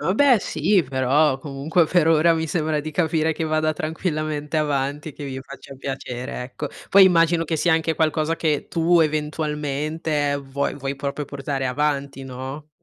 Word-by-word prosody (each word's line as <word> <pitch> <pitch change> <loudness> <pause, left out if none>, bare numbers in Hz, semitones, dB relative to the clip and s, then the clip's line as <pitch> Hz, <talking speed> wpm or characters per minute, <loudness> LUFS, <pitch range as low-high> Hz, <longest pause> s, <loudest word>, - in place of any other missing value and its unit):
Oh, 170 +6 0
beh 265 -1 +5
sì, 180 +1 +1
però 135 +2 +2
comunque 150 +5 +1
per 175 -1 +2
ora 165 +1 +5
mi 160 0 -1
sembra 155 -1 0
di 155 +1 -5
capire 160 0 +1
che 160 - -5
vada 155 0 +1
tranquillamente 155 -2 -3
avanti 145 0 -1
e 150 - -8
che 145 - -8
vi 135 -1 -5
faccia 135 +1 -11
piacere, 130 -2 -5
ecco. 135 +3 -6 0.2
Poi 200 - +7
immagino 170 -2 +4
che 160 0 -1
sia 175 +2 +2
anche 160 0 +1
qualcosa 160 0 +1
che 155 -3 -1
tu, 170 +1 +3
eventualmente, 150 -1 -1
vuoi 140 0 -3
vuoi 135 0 -3
proprio 140 +1 -4
portare 135 -1 -3
avanti, 140 0 -1
no? 135 +3 -7
150 Hz, 170 wpm, -22 LUFS, 140-160 Hz, 0.2 s, Poi